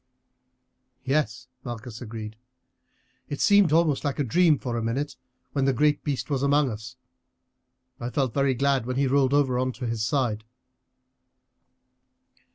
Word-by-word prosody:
"Yes," 130 -3 -1 0.2
Malchus 120 -1 -7
agreed; 110 -2 -7 0.9
"it 145 - -4
seemed 200 -5 +5
almost 160 -3 +3
like 145 -2 -1
a 145 - +1
dream 160 +4 +3
for 120 -2 -4
a 115 - -1
minute 130 +5 -2 0.4
when 140 -2 0
the 135 - +3
great 150 +4 +2
beast 140 -3 -2
was 140 -3 -1
among 140 -1 +3
us. 110 +3 -8 1.0
I 120 - -4
felt 130 -3 -1
very 140 -1 +2
glad 135 -1 +1
when 130 - -2
he 140 +1 +2
rolled 135 0 +3
over 130 -4 +2
on 130 0 0
to 125 +2 -6
his 115 -2 -2
side." 120 -4 0
130 Hz, 150 wpm, -26 LUFS, 120-145 Hz, 1.0 s, seemed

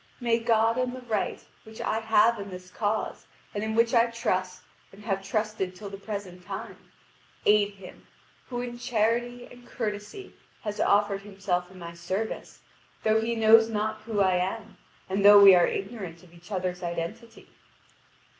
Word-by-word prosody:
"May 235 -2 +1
God 230 +1 +2
and 255 0 -1
the 255 - -8
right, 225 -4 -2 0.2
which 220 0 -13
I 220 - -1
have 225 0 +3
in 200 0 -6
this 185 -1 -10
cause, 215 +2 -2 0.3
and 205 - -3
in 220 0 -2
which 230 +1 +3
I 235 -1 +5
trust 185 -5 -2 0.3
and 200 +2 -15
have 195 -3 -1
trusted 210 -2 -2
till 200 +1 -8
the 195 - -7
present 200 -3 -7
time, 195 +2 -7 0.7
aid 205 -1 +4
him, 190 -2 -13 0.4
who 245 -1 -4
in 240 -1 -6
charity 240 +1 0
and 245 0 -14
courtesy 215 - -5 0.3
has 210 -1 -5
offered 200 -1 +2
himself 195 -3 -3
in 190 - -14
my 170 -1 -8
service, 185 +6 -4 0.4
though 220 0 +3
he 235 +1 -1
knows 225 0 +6
not 215 0 -2
who 215 -2 -1
I 185 -2 +3
am, 200 +3 -3 0.3
and 195 +1 -1
though 205 0 +10
we 200 -1 +10
are 175 -1 +5
ignorant 195 -5 -5
of 175 -2 -19
each 175 +4 -16
other's 180 -2 -2
identity." 175 +7 -6
210 Hz, 170 wpm, -27 LUFS, 190-225 Hz, 0.7 s, though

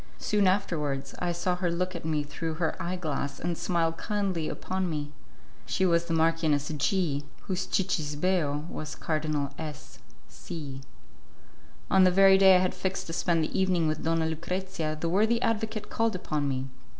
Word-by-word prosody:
Soon 205 -2 +2
afterwards 150 -8 0
I 175 -1 0
saw 175 +1 0
her 180 -1 0
look 180 +2 -1
at 170 - -6
me 155 -2 0
through 160 +2 -4
her 160 -1 -1
eye 180 +2 -2
glass 145 -5 -3
and 175 0 -1
smile 165 -1 +1
kindly 190 -2 -1
upon 185 -1 -2
me. 145 -2 -3 0.6
She 125 +10 +1
was 170 -1 +3
the 165 - -2
Marchioness 160 -3 +2
G, 155 -1 0 0.2
whose 185 -1 -2
'cicisbeo' 155 -3 0
was 155 -3 -6
Cardinal 155 -3 -1
S 155 -3 -8 0.3
C. 145 -6 -7 1.1
On 190 -1 +6
the 185 - +7
very 190 +1 +6
day 190 -1 +8
I - - +6
had 185 - +1
fixed 190 0 -3
to 165 - -6
spend 165 -1 +1
the 155 - -2
evening 180 -4 +2
with 155 0 -2
Donna 165 0 +1
Lucrezia 165 0 -3
the 165 - -1
worthy 215 +7 +3
advocate 220 -1 -1
called 225 -3 +1
upon 150 -5 -1
me. 130 -1 -1
170 Hz, 170 wpm, -28 LUFS, 155-185 Hz, 1.1 s, day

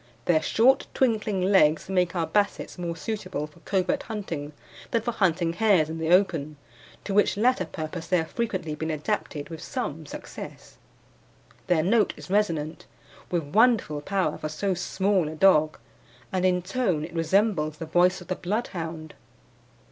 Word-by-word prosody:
Their 160 -3 +3
short, 245 +10 +3
twinkling 215 -6 +1
legs 170 -5 +4
make 180 -1 +1
our 170 -2 +1
Bassets 205 -1 -1
more 170 -1 -3
suitable 185 -3 -4
for 150 +2 -17
covert 185 +1 0
hunting 170 -10 -5 0.4
than 230 -2 0
for 240 - -1
hunting 175 -6 +1
hares 185 -6 +3
in 165 - -5
the 160 0 -1
open, 165 -5 +2 0.5
to 200 - -4
which 205 0 +3
latter 235 -3 +2
purpose 160 +1 -6
they 180 - +3
have 160 -1 -2
frequently 190 -9 -2
been 160 +1 -4
adapted 155 -2 -3
with 160 -2 -8
some 155 +1 -4
success. - - -9 0.9
Their 165 -3 +3
note 210 +3 +2
is - - -10
resonant, 165 -7 0 0.4
with 175 -2 0
wonderful 200 - +2
power 190 -2 -1
for 155 - -4
so 190 +6 -1
small 190 0 0
a 160 - -7
dog, 155 -3 +4 0.5
and 185 -1 0
in 180 -1 +1
tone 185 -6 0
it 170 - -11
resembles 165 -2 +1
the 165 - -5
voice 180 +3 +3
of 180 - -12
the 185 - -1
Bloodhound. 170 -6 -4
180 Hz, 160 wpm, -26 LUFS, 160-200 Hz, 0.9 s, legs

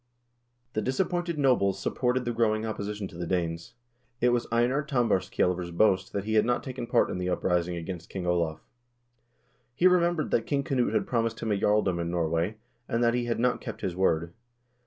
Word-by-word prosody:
The 110 - 0
dis 130 +3 -2
appointed 175 -3 0
nobles 125 -9 +3
supported 125 0 0
the 120 - -1
growing 110 -1 +1
opposition 105 -2 -4
to 85 - -12
the 85 - -3
Danes. 85 -2 -2 0.4
14 125 - +3
It - - +5
was 120 -1 0
Einar 120 +5 +2
Tambarskjaelver's 95 -9 0
boast 95 +1 +2
that 100 - -2
he 110 +1 -2
had 110 -1 +5
not 120 +2 0
taken 130 -2 -5
part - - +2
in 90 - -3
the 90 0 -1
uprising 90 -1 0
against 85 0 -6
King 95 -2 -5
Olav. 85 -3 0 1.2
lie 180 - +6
remembered 175 -3 +2
that 115 - +1
King 140 -1 0
Knut 130 -3 0
had - - +1
promised 115 -2 -1
him 110 - -1
a - - +3
jarldom 100 -3 +2
in 85 - -2
Norway, 85 +4 -1 0.3
and 115 +1 0
that 115 0 +3
he 120 0 0
had 115 -1 -1
not 125 +1 +1
kept 115 - -7
his 90 -2 -2
word. 85 -2 +1
110 Hz, 200 wpm, -28 LUFS, 90-125 Hz, 1.2 s, lie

